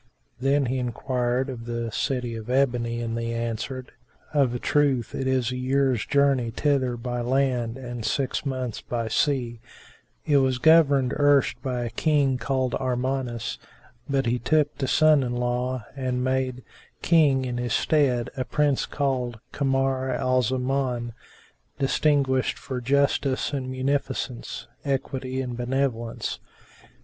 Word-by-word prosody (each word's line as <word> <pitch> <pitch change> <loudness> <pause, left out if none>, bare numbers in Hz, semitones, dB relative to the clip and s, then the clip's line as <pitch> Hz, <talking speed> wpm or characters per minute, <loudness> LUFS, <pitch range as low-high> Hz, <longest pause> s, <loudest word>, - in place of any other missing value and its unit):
Then 135 +2 +2
he 130 +1 -1
enquired 125 +1 -1
of 120 -4 -6
the 115 -1 -3
City 125 0 -2
of 110 +1 -7
Ebony 120 -3 +1
and 115 -1 -3
they 115 0 -2
answered, 115 +3 -4 0.4
"Of 135 -5 +2
a - - 0
truth 135 -3 +1
it 135 - -2
is 130 -2 +1
a 125 - -3
year's 130 -2 +1
journey 140 -5 +3
thither 130 0 0
by 120 0 -3
land 125 -2 0
and 120 -3 -6
six 135 +3 -1
months 130 -5 -3
by 115 -2 -3
sea: 120 -2 0 0.7
it 145 -2 +4
was 130 -2 +2
governed 145 -3 +5
erst 145 -4 +3
by 125 -2 -2
a 120 - -4
King 140 0 +2
called 130 -2 -1
Armanus; 125 -2 -2 0.5
but 135 -1 +1
he 120 +1 +1
took 155 +4 +1
to 135 - 0
son 155 0 +5
in 125 -2 -2
law 125 -1 -1
and 130 -2 -1
made 130 -1 -1 0.4
King 145 -6 +4
in 120 -1 -3
his 120 0 -1
stead 130 -6 +2
a 130 - -1
Prince 145 +1 +1
called 125 -5 -1
Kamar 135 -1 0
al 130 0 +2
Zaman 125 -1 -1 0.6
distinguished 135 -2 +2
for 130 -2 -5
justice 140 +1 +1
and 130 -2 -2
munificence, 130 -2 -2 0.2
equity 130 -1 -2
and 125 -2 -4
benevolence." 125 -2 -2
130 Hz, 140 wpm, -25 LUFS, 120-135 Hz, 0.7 s, governed